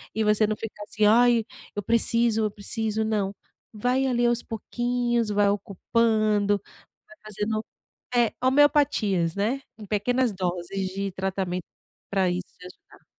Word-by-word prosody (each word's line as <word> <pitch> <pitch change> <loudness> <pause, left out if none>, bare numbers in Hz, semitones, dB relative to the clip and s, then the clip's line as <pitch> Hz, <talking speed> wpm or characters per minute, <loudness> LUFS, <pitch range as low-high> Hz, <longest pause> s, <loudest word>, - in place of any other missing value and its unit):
E 220 - +1
você 210 0 +3
não 215 - -1
ficar 215 -2 -8
assim 215 0 0
"Ai, 235 +1 +5 0.3
eu 205 - -3
preciso, 230 0 +2
eu 215 - +1
preciso," 220 +1 -2
não, 205 -2 -1 0.4
vai 250 +5 +1
ali 240 -2 +1
aos 240 0 +1
pouquinhos, 240 0 -1
vai 205 0 +3
ocupando 205 0 +1 0.5
vai 340 - -16
fazendo 215 +1 -3 0.5
é 240 -2 +4
homeopatias, 260 - +3
né. 240 +7 0 0.2
Em 210 - -9
pequenas 240 +4 +1
doses 185 +1 -3
de 195 0 -2
tratamento 185 -2 -3 0.5
para 195 -2 +2
isso 180 +1 -2 0.2
te 180 - -11
ajudar. 180 - -17
215 Hz, 140 wpm, -25 LUFS, 200-235 Hz, 0.5 s, Ai